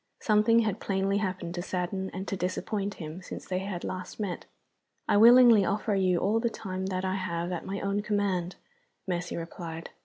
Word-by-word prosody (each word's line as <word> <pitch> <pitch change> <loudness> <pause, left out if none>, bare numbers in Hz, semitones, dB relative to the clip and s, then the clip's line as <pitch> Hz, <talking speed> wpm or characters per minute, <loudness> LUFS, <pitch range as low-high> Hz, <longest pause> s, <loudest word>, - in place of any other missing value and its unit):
Something 220 +2 +4
had 215 -2 -1
plainly 195 0 0
happened 185 -4 -3
to 175 - -3
sadden 190 +1 -3
and 190 +1 -6
to - - -2
disappoint 195 +2 -2
him 160 +2 -7
since - - -8
they 185 0 -1
had 190 -2 -5
last 185 +3 -6
met. 200 -4 -3 0.6
"I - - +3
willingly 235 -1 +8
offer 210 +3 0
you 185 -2 +2
all 205 +6 +2
the 235 0 +1
time 190 -4 -5
that 185 0 -2
I 185 - 0
have 175 -2 -2
at 175 - -4
my 195 +1 -3
own 200 +1 0
command," 200 -4 -1 0.5
Mercy 175 -1 -2
replied. 165 0 -7
190 Hz, 185 wpm, -28 LUFS, 180-205 Hz, 0.6 s, willingly